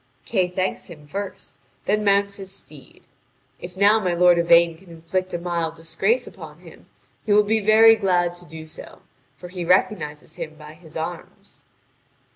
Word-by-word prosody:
Kay 190 -5 +1
thanks 185 +1 -3
him 150 -4 -13
first, 195 +5 -7 0.3
then 210 +1 +1
mounts 200 0 +2
his 195 -1 -8
steed. - - -13 0.6
If 180 +1 -10
now 205 +3 +5
my 180 -4 -1
lord 175 0 +5
Yvain 170 0 +5
can 180 +2 -19
inflict 170 +3 -4
a - - -2
mild 170 -2 -3
disgrace 165 - 0
upon - - -12
him, - - -16 0.4
he 210 - +1
will 210 0 +6
be 220 +2 +1
very 220 +2 +6
glad 180 -4 +1
to 175 - -12
do 160 -1 -10
so; 155 - -10 0.3
for 180 - -10
he 180 -1 -5
recognises 165 -4 0
him 155 - -6
by 150 0 -12
his 160 -1 -12
arms. 165 +1 -8
180 Hz, 170 wpm, -22 LUFS, 165-200 Hz, 0.6 s, will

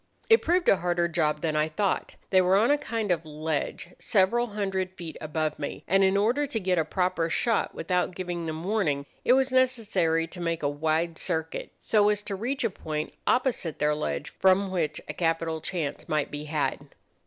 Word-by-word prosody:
It 450 - +7
proved 350 +2 +1
a 195 - +6
harder 175 -1 +1
job 155 -3 0
than 155 -2 -1
I 155 0 +2
thought. 195 +5 -1 0.2
They 185 -1 +6
were 185 +1 +4
on 225 +6 +4
a 290 - +4
kind 225 -8 -2
of 165 -2 +1
ledge 155 +3 -3
several 230 +4 +2
hundred 195 -3 -2
feet 165 -3 -7
above 155 0 -2
me, 145 - -5
and 195 +2 +4
in 190 +1 +3
order 245 +8 +2
to 240 -5 -2
get 185 -3 +1
a - - +3
proper 180 0 0
shot 230 +6 0
without 180 -1 -1
giving 175 -2 -4
them 160 +1 -4
warning, 175 -9 0 0.2
it 245 - +5
was 265 0 +3
necessary 210 -11 +2
to 175 +2 -10
make 165 -2 -2
a - - +3
wide 160 +3 -1
circuit, 160 0 -3
so 210 -1 +3
as 210 0 0
to 200 - -3
reach 250 +8 -2
a 230 - +1
point 155 -3 -4
opposite 245 - +1
their 150 0 +2
ledge 150 +1 -3
from 190 +1 +3
which 160 -5 -1
a - - -4
capital 165 -1 -1
chance 165 -5 -4
might 150 -1 0
be 150 +1 -5
had. 145 -2 -2
175 Hz, 200 wpm, -27 LUFS, 155-205 Hz, 0.2 s, It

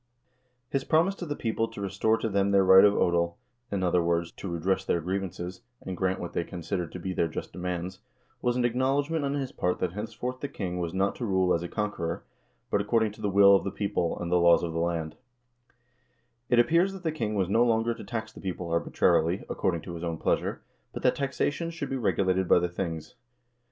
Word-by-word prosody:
His 135 -1 0
promise 165 +7 +3
to 175 - -6
the 145 - -2
people 115 -2 -1
to 115 -2 -10
restore 100 +3 +1
to 115 - -2
them 100 -1 +1
their 100 -1 +4
right 95 0 +8
of 105 0 +5
odel, 85 -1 +2 0.4
in 100 -2 -1
other 90 -1 +3
words, 85 0 0
to 95 - -8
redress 85 +3 0
their 85 - +1
grievances, 90 0 -4 0.2
and 95 - -6
grant 95 +1 0
what 85 - -6
they 85 - 0
con 90 +1 -8
sidered 85 0 -2
to 90 - -6
be 95 +2 -3
their 85 - +1
just 80 - -6
demands, 90 +1 -4 0.4
was 120 0 +1
an 125 -1 +1
acknowledgment 140 +6 +1
on 140 0 -1
his 135 -3 -3
part 90 0 -1
that 90 -1 -2
henceforth 115 +5 -5
the 145 - -3
king 90 -9 -4
was 85 -1 -2
not 95 +2 +1
to 120 - -3
rule 95 -2 +2
as 85 - +1
a 85 - -4
conqueror, 95 -5 -3 0.5
but - - +2
according 110 -2 +1
to 105 - -14
the 105 - 0
will 100 0 +7
of - - +2
the - - -2
people 95 -4 -1
and 85 0 -4
the 90 - +4
laws 85 0 +5
of 85 -1 -3
the 85 - -1
land 85 -2 -2 1.3
It 120 - +4
appears 170 +11 +4
that 190 -1 -9
the 160 - 0
king 110 -9 -2
was 95 -3 +1
no 115 +5 +3
longer 115 0 +2
to 115 - -10
tax 110 -1 -4
the - - -12
people 90 -3 -4
arbitrarily, 85 +1 +2
according 90 -5 0
to 85 - -8
his 85 0 -6
own 85 -1 -2
pleasure, - - -1 0.3
but - - -6
that - - +4
taxation 140 +4 -1
should 165 -5 -5
be - - 0
regulated 95 -6 +1
by - - +6
the 90 0 +1
things. 85 -3 -4
95 Hz, 225 wpm, -28 LUFS, 85-115 Hz, 1.3 s, right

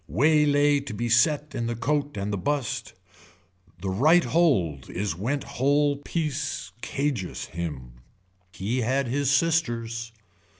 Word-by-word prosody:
Way 150 - +3
lay 145 0 +4
to 140 -6 -7
be 120 +2 -2
set 150 +5 +3
in 120 -2 -2
the 120 - -2
coat 145 +3 -1
and 100 +1 -2
the - - 0
bust. 135 0 -2 0.9
The 95 - -1
right 155 - +5
hold 95 - +1
is 95 -3 -2
went 130 - -2
hole 145 +2 +1
piece 145 - -3
cageous 135 -9 -2
him. 65 -8 -6 0.5
He 110 +6 -2
had 130 +4 +1
his 140 +2 0
sisters. 120 -7 0
130 Hz, 135 wpm, -26 LUFS, 105-145 Hz, 0.9 s, right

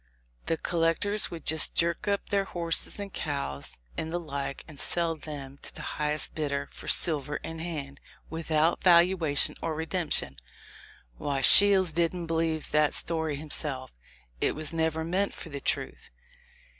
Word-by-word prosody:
The 165 - 0
collec 165 -1 0
tors, 205 +1 +3
would 165 -3 -9
just 160 0 +1
jerk 170 +2 0
up 200 -1 -1
their 200 -1 0
horses 170 +1 -2
and 200 -1 -7
cows, 140 - -5 0.2
and 160 - -4
the 175 - -2
like, 140 -4 -6
and 155 -2 -11
sell 170 -1 -1
them 140 -3 -9
to - - -9
the - - -9 0.2
highest 150 0 0
bidder 140 -2 -3
for - - -12
silver 150 -3 +2
in 160 +2 -7
hand, 145 -5 -6 0.3
without 160 0 0
valuation 170 -4 +4
or 160 -1 -3
redemption. 160 0 -2 0.8
Why, 140 -2 -2
Shields 190 +4 +9
didn't 170 +1 -1
believe 165 -1 -2
that 150 -1 +2
story 160 -3 -2
himself: 140 -3 -4 0.5
it - - 0
was 155 +1 -5
never 160 -1 -1
meant 185 +5 -1
for 165 - -10
the 140 -2 -7
truth. - - -3
160 Hz, 155 wpm, -27 LUFS, 150-170 Hz, 0.8 s, Shields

